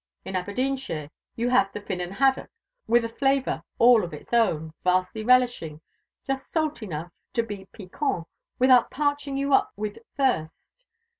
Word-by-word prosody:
In 190 - -5
Aberdeenshire 205 - -2 0.2
you 235 +1 -1
have 200 -6 +3
the 210 - -6
Finnan 180 -3 -4
haddo' 265 +7 +2 0.4
with 235 0 +4
a - - 0
flavour 270 +3 0 0.2
all 235 -2 +6
its - - -10
own, 160 -9 +2
vastly 185 +4 +1
relishing 245 -11 +2 0.5
just 270 0 -3
salt 310 -5 -1
enough 170 -4 -5 0.2
to 230 - +1
be 205 -3 -7
piquant, 200 - -3 0.3
without 255 -1 +5
parching 285 -1 -1
you 280 0 0
up - - +4
with 210 0 -5 0.2
thirst. 245 - 0
230 Hz, 145 wpm, -26 LUFS, 185-265 Hz, 0.5 s, all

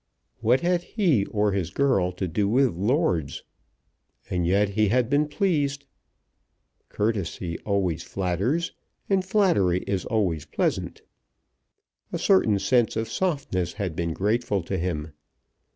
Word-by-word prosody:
What 120 +3 +3
had 175 0 +1
he 170 - +1
or 105 -1 +1
his 95 -4 -1
girl 100 -10 +1
to 90 +1 -3
do 100 +5 0
with 130 0 +3
lords? 95 - 0 0.9
And 90 -2 0
yet 100 +3 +3
he 105 +1 +2
had 125 +4 +1
been 145 +1 +3
pleased. 145 -4 0 1.0
Courtesy 95 -5 -2
always 95 -5 0
flatters, 100 - -1 0.4
and 190 -1 +3
flattery 175 - +2
is 95 -2 -1
always 95 - 0
pleasant. - - -2 1.1
A - - -2
certain 100 +2 +3
sense 120 +3 +2
of 110 0 -2
softness 135 - -1
had 95 -6 -4
been 85 0 -1
grateful 105 0 0
to 95 +3 -3
him. 80 -3 -3
105 Hz, 130 wpm, -25 LUFS, 90-140 Hz, 1.1 s, What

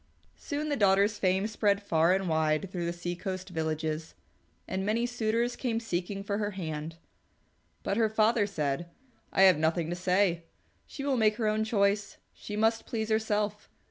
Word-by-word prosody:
Soon 300 0 -3
the 290 - +1
daughter's 200 -1 +3
fame 190 +1 +2
spread 210 -2 +1
far 165 -3 +3
and 190 -1 -2
wide 160 +3 +1
through 175 -2 -3
the - - 0
sea 175 0 -4
coast 185 +1 -5
villages, 160 -1 -3 0.5
and 190 0 -2
many 220 +4 +1
suitors 240 0 0
came 230 -3 -1
seeking 195 -2 -3
for 200 +1 -2
her 205 -1 -1
hand. 160 -2 -4 0.9
But 195 - -1
her 225 -2 +3
father 215 0 +3
said, 155 -2 -2 0.4
"I 195 - +4
have 185 -5 +6
nothing 160 +1 0
to - - -1
say. 180 -1 +1 0.4
She 275 - -7
will 275 -2 +1
make 215 -2 +3
her 220 - -2
own 215 +1 +1
choice. 205 -2 +1 0.2
She 210 - -7
must 225 +1 +1
please 220 -1 -2
herself. 210 -1 0
200 Hz, 175 wpm, -29 LUFS, 175-220 Hz, 0.9 s, have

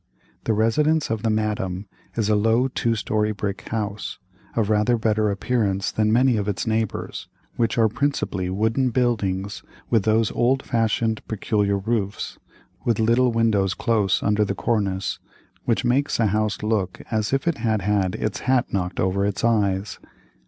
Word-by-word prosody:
The 115 - +2
residence 150 +8 +2
of 110 -2 -1
the 115 - 0
Madame 105 -3 -1 0.3
is 110 -3 0
a 105 - +3
low 115 +5 +3
two 115 -3 0
story 105 0 0
brick 100 -1 -4
house, 105 -2 -3 0.4
of 115 -3 +1
rather 105 +3 +3
better 110 -1 +1
appearance 100 -2 0
than 110 0 +1
many 125 +1 +4
of 100 -1 -2
its 100 -3 -2
neighbors, 110 -2 -2 0.3
which 115 0 0
are 115 -1 +5
principally 110 -7 -1
wooden 110 +7 +1
buildings 100 -6 -1 0.3
with 115 -3 +4
those 110 +1 +2
old 130 +3 +1
fashioned 115 -2 0
peculiar 105 -1 0
roofs, 100 -1 -2 0.4
with 115 -3 +1
little 115 +3 +3
windows 110 -5 +2
close 105 -6 +1
under 105 0 +2
the 100 -1 -2
cornice, 100 -4 -1 0.5
which 115 +1 +1
make 135 +4 +2
a 115 - +4
house 110 +1 0
look 105 -4 -1
as 110 -2 0
if 135 +4 0
it 170 -6 +1
had 110 -4 0
had 100 -2 +1
its 105 -1 -2
hat 130 -1 +1
knocked 90 -2 -2
over 95 +2 +1
its 100 -1 -1
eyes. 100 -3 +1
110 Hz, 160 wpm, -23 LUFS, 100-115 Hz, 0.5 s, are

